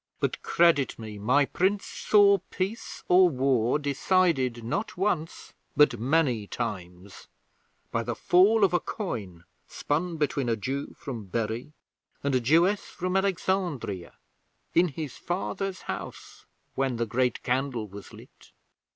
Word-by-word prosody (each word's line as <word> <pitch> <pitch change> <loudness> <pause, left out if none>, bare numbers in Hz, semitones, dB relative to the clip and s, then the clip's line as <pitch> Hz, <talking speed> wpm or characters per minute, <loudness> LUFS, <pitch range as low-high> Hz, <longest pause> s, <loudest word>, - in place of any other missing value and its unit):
'But, - - -1
credit 165 -6 +3
me, 110 -2 -8
my 130 +7 +3
Prince 195 +7 0
saw 200 -1 +4
peace 195 +5 -4
or 180 0 +6
war 130 -3 +1
decided 145 -4 +1
not 200 - -3
once, 175 -4 -2 0.2
but 150 -6 +5
many 125 -4 +1
times, 90 -5 -6 0.6
by 115 - 0
the 115 0 -3
fall 200 - +4
of 190 - +4
a 175 - +4
coin 105 - -5 0.2
spun 165 +3 -2
between 140 -4 0
a 115 - +2
Jew 135 +6 -4
from 120 -7 -6
Bury 115 +7 -3 0.5
and 140 -1 0
a 130 - +3
Jewess 170 - +3
from 185 +1 -4
Alexandria, 180 - -1 0.6
in 175 +2 +4
his 150 -3 -6
father's 190 +1 -3
house, - - -8 0.3
when 135 -2 0
the 115 0 -1
Great 125 +3 0
Candle 125 -3 -1
was 100 0 -11
lit. - - -16
140 Hz, 135 wpm, -27 LUFS, 115-180 Hz, 0.6 s, or